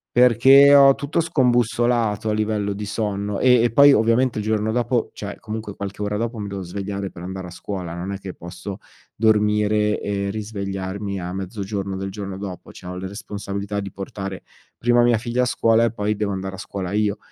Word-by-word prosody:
perché 130 Hz, +4 st, +7 dB
ho 135 Hz, -1 st, +8 dB
tutto 145 Hz, +3 st, -2 dB
scombussolato 120 Hz, -7 st, +1 dB
a -, -, +1 dB
livello 105 Hz, -1 st, -1 dB
di 105 Hz, +1 st, -5 dB
sonno. 105 Hz, -1 st, -2 dB
Ehm, 125 Hz, -2 st, +5 dB
e 120 Hz, -, +1 dB
poi 140 Hz, +4 st, +7 dB
ovviamente 115 Hz, +1 st, +2 dB
il -, -, -3 dB
giorno 110 Hz, 0 st, 0 dB
dopo, 120 Hz, 0 st, 0 dB
cioè 100 Hz, -1 st, -7 dB
comunque 110 Hz, -2 st, -6 dB
qualche 100 Hz, 0 st, -6 dB
ora 105 Hz, 0 st, -1 dB
dopo, 115 Hz, +1 st, -3 dB
mi 105 Hz, -, -4 dB
devo 100 Hz, -1 st, -5 dB
svegliare 100 Hz, +2 st, -5 dB
per 85 Hz, -, -11 dB
andare 95 Hz, +1 st, -6 dB
a -, -, -8 dB
scuola, 90 Hz, -2 st, -6 dB
non 90 Hz, +3 st, -5 dB
è -, -, -4 dB
che 95 Hz, -1 st, -8 dB
posso 95 Hz, +3 st, -8 dB, 0.4 s
dormire 105 Hz, -1 st, +2 dB
e 100 Hz, -1 st, -2 dB
risvegliarmi 100 Hz, -2 st, -4 dB
a 90 Hz, 0 st, -5 dB
mezzogiorno 95 Hz, 0 st, -4 dB
del 95 Hz, 0 st, -4 dB
giorno 100 Hz, -1 st, -6 dB
dopo, 95 Hz, -3 st, -7 dB
cioè 90 Hz, -, -12 dB
ho 90 Hz, -, -5 dB
le 95 Hz, +1 st, -5 dB
responsabilità 100 Hz, 0 st, -5 dB
di 100 Hz, -1 st, -6 dB
portare 95 Hz, -1 st, -6 dB, 0.3 s
prima 120 Hz, 0 st, +3 dB
mia 120 Hz, -1 st, +4 dB
figlia 120 Hz, +1 st, 0 dB
a -, -, +2 dB
scuola 115 Hz, -2 st, +3 dB
e 115 Hz, -, +2 dB
poi 105 Hz, -1 st, -1 dB
devo 105 Hz, -1 st, -2 dB
andare 95 Hz, 0 st, -4 dB
a -, -, -11 dB
scuola 100 Hz, -1 st, -5 dB
io. 105 Hz, -1 st, +1 dB
105 Hz, 200 wpm, -22 LUFS, 100-115 Hz, 0.4 s, ho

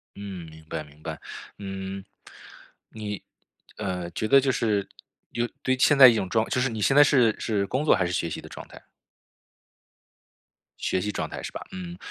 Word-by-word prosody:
嗯， 95 Hz, -4 st, -7 dB
明 80 Hz, 0 st, -14 dB
白 80 Hz, -1 st, -4 dB
明 75 Hz, +1 st, -19 dB
白。 -, -, -6 dB, 0.4 s
嗯， 95 Hz, -1 st, -6 dB, 0.9 s
你， 105 Hz, -2 st, -6 dB, 0.6 s
呃， 90 Hz, -4 st, -3 dB
觉 110 Hz, +5 st, -2 dB
得 140 Hz, +3 st, +7 dB
就 135 Hz, 0 st, +1 dB
是， 105 Hz, -5 st, 0 dB, 0.4 s
有 120 Hz, 0 st, -1 dB, 0.2 s
对 130 Hz, -, +2 dB
现 145 Hz, +2 st, +4 dB
在 135 Hz, -1 st, +11 dB
一 120 Hz, -, +7 dB
种 95 Hz, -3 st, -1 dB
状 110 Hz, +3 st, +2 dB
态 -, -, -12 dB
就 125 Hz, -, +2 dB
是 135 Hz, -, +1 dB
你 110 Hz, -2 st, -5 dB
现 135 Hz, -, +3 dB
在 145 Hz, -, +9 dB
是 125 Hz, -6 st, +4 dB
是 105 Hz, -3 st, 0 dB
工 135 Hz, +4 st, -1 dB
作 150 Hz, -, +6 dB
还 90 Hz, -2 st, +1 dB
是 85 Hz, -, -2 dB
学 85 Hz, -, -1 dB
习 -, -, -5 dB
的 -, -, -11 dB
状 -, -, -9 dB
态？ -, -, -14 dB, 2.0 s
学 95 Hz, -, 0 dB
习 105 Hz, +2 st, -2 dB
状 -, -, -3 dB
态 -, -, -6 dB
是 -, -, -5 dB
吧？ -, -, -7 dB
嗯。 180 Hz, -2 st, -7 dB
105 Hz, 215 characters per minute, -26 LUFS, 95-130 Hz, 2.0 s, 在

